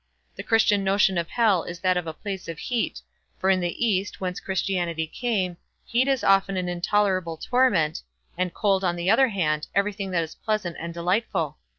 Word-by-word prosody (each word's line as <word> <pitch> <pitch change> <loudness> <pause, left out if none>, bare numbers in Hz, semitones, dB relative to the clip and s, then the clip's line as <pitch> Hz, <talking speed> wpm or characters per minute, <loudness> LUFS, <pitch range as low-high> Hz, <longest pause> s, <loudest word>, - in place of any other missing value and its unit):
The - - -6
Christian 215 -3 +3
notion 195 -2 +3
of 170 - -3
Hell 215 -7 +2
is 175 0 -7
that 185 -1 +2
of 180 -2 -2
a 160 - -4
place 195 -1 -6
of 165 -2 -5
heat, 240 +5 -2 0.3
for 190 - +2
in 185 - +3
the 175 +7 -1
East, 200 -2 -1
whence 180 -1 -3
Christianity 175 -4 -1
came, 185 -2 -2 0.3
heat 245 +3 +1
is 270 -3 +1
often 195 0 +3
an 180 -1 -1
intolerable 180 -1 0
torment, 185 -8 +2 0.3
and 180 0 -1
cold, 195 +1 +1
on 175 -2 +1
the 175 +2 +1
other 265 +4 +5
hand, 155 -8 -1
everything 200 -1 0
that 175 -2 +1
is 160 - -8
pleasant 210 -6 -2
and 170 +1 -5
delightful. 180 +7 -1
190 Hz, 190 wpm, -25 LUFS, 175-205 Hz, 0.3 s, other